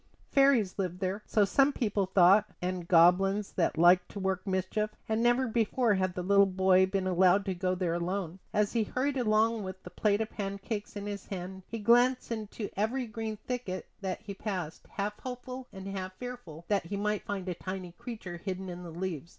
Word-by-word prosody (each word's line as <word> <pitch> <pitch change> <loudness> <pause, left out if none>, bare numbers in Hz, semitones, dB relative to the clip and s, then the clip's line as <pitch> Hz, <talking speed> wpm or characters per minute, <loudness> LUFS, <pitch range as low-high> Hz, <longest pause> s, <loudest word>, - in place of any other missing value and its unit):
Fairies 270 -9 +4
lived 180 -2 -2
there, 190 +2 -2
so 210 -2 +3
some 275 +7 +4
people 210 -7 0
thought, 190 +3 +5
and 180 -1 -3
goblins 195 +4 +4
that 170 -3 0
liked 175 +2 +5
to 200 - -7
work 190 0 -2
mischief; 190 +3 0 0.2
and 220 +1 0
never 240 +2 +3
before 230 0 +2
had 185 -2 0
the 180 - -3
little 200 +1 +5
boy 190 0 +4
been 190 0 -1
allowed 185 +2 +4
to 190 - -1
go 185 +1 -1
there 180 -2 -1
alone. 175 +1 -3
As 210 -1 +1
he 230 - +2
hurried 265 +6 -1
along 225 -2 +2
with 190 -1 -7
the 180 - -10
plate 205 +3 +1
of 220 0 -2
pancakes 200 +1 -4
in 205 0 -5
his 205 -1 -6
hand 190 0 -6
he 230 - -5
glanced 245 +4 +3
into 215 -1 -4
every 235 +6 0
green 220 -1 -5
thicket 240 -8 -3 0.2
that 190 -2 -3
he 200 - -7
passed, 185 -5 -5
half 210 +1 -3
hopeful, 255 0 -7
and 190 0 -8
half 190 -1 -4
fearful 245 -11 -8
that 200 -5 0
he 200 - -3
might 210 0 0
find 195 -2 -3
a 180 - -1
tiny 185 0 -6
creature 220 -4 -7
hidden 185 +1 -5
in 175 0 -7
the 175 - -8
leaves. 170 -1 -4
195 Hz, 200 wpm, -30 LUFS, 185-220 Hz, 0.2 s, thought